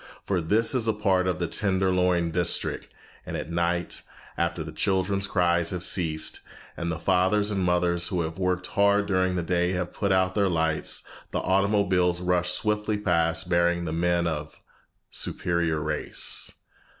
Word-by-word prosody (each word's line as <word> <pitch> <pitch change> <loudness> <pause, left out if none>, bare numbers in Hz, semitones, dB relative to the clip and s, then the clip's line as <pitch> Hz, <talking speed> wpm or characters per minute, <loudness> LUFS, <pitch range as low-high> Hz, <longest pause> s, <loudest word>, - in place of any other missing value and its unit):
For 95 -3 0
this 105 +10 +1
is 120 -3 0
a 110 - +3
part 95 -3 +1
of 90 -3 0
the 85 - -1
Tenderloin 90 -3 +1
district, 85 0 -1 0.3
and - - -5
at 80 - -6
night, 85 +1 -1 0.3
after 85 -1 -1
the 80 - -8
children's 95 +1 0
cries 85 -2 +1
have 90 -1 -3
ceased, 80 -5 +1 0.4
and 85 0 -3
the 80 - -3
fathers 95 +4 +2
and 95 -2 -1
mothers 90 -1 +1
who 90 -5 -1
have 80 +2 -6
worked 90 0 0
hard 100 +1 +2
during 95 -2 +1
the 90 - -1
day 90 +1 +1
have 90 -1 -3
put 100 -2 -1
out 95 -1 +2
their 100 -1 +2
lights, 80 -2 -1 0.3
the - - -3
automobiles 95 -2 +2
rush 90 0 0
swiftly 105 +3 0
past, 85 -4 0
bearing 85 0 +2
the 80 - -3
men 85 +1 +1
of 80 -2 -3
the - - -23 0.5
"superior 85 -3 -1
race." 75 0 -2
90 Hz, 165 wpm, -26 LUFS, 85-95 Hz, 0.5 s, a